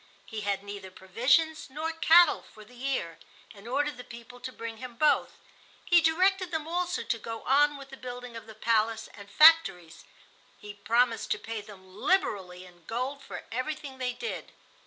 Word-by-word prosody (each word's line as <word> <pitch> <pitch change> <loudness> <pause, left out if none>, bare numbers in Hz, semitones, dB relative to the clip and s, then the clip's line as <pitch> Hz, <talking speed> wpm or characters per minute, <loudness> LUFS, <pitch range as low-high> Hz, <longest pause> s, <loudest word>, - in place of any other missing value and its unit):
He 220 -1 -6
had 200 -1 -2
neither 200 -1 -8
provisions 255 - +1
nor 310 +4 -3
cattle 325 +1 +5
for 215 -1 -14
the 250 - -18
year, 245 -10 -3 0.3
and 205 +1 -14
ordered 285 +2 -1
the 250 - -8
people 235 +1 -12
to 255 - -6
bring 230 -2 -7
him 250 0 -9
both. 305 +5 +2 0.5
He 345 -1 +5
directed 370 +3 +2
them 320 -2 -3
also 355 +1 -1
to 230 - -2
go 225 +1 -7
on 290 +2 +3
with 275 -1 -12
the 270 - -9
building 245 -1 -8
of 230 - -9
the 220 - -11
palace 225 0 0
and 200 -1 -12
factories. 255 - +5 0.5
He 205 0 -10
promised 230 +3 +1
to - - -5
pay 225 -1 -6
them 190 -3 -15
liberally 190 - 0
in 175 -1 -18
gold 255 +5 -3
for - - -9
everything 265 +2 -4
they 250 -1 -1
did. 460 - -6
245 Hz, 180 wpm, -28 LUFS, 215-295 Hz, 0.5 s, cattle